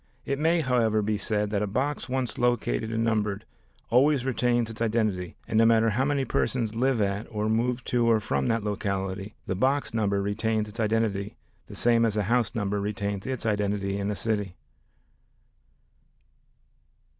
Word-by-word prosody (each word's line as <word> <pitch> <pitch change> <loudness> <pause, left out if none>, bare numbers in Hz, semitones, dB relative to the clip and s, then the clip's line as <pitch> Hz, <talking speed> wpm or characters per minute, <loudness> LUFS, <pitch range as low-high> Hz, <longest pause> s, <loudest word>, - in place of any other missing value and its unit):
It 140 0 -2
may, 165 +2 +3
however, 115 -6 +2
be 105 +1 0
said 105 0 -1
that 105 -1 0
a 105 - 0
box 130 +7 -2
once 130 -3 -2
located 115 - 0
and 115 0 0
numbered 105 -2 0 0.5
always 130 +2 +4
retains 120 -3 +1
its 110 - -10
identity 110 -6 0
and 110 - +1
no 115 - +6
matter 115 -1 +4
how 130 +6 +1
many 140 -2 0
persons 115 -2 -1
live 125 +1 +1
at, 100 +2 -2
or 105 -1 -2
move 120 +3 0
to 120 -1 +1
or 115 -1 +4
from 70 -9 -1
that 115 -1 0
locality, 100 -1 -3
the - - -2
box 130 +8 +1
number 100 -3 +1
retains 105 +2 -1
its 105 +3 -10
identity 105 -2 0 0.3
the - - -10
same 115 -1 +3
as 110 -2 +1
a 105 - +2
house 115 +1 +2
retains 100 -1 -2
its 130 -3 -3
identity 100 -2 0
in 100 0 -1
a 105 - -1
city. 105 -4 -2
110 Hz, 170 wpm, -27 LUFS, 100-120 Hz, 0.5 s, no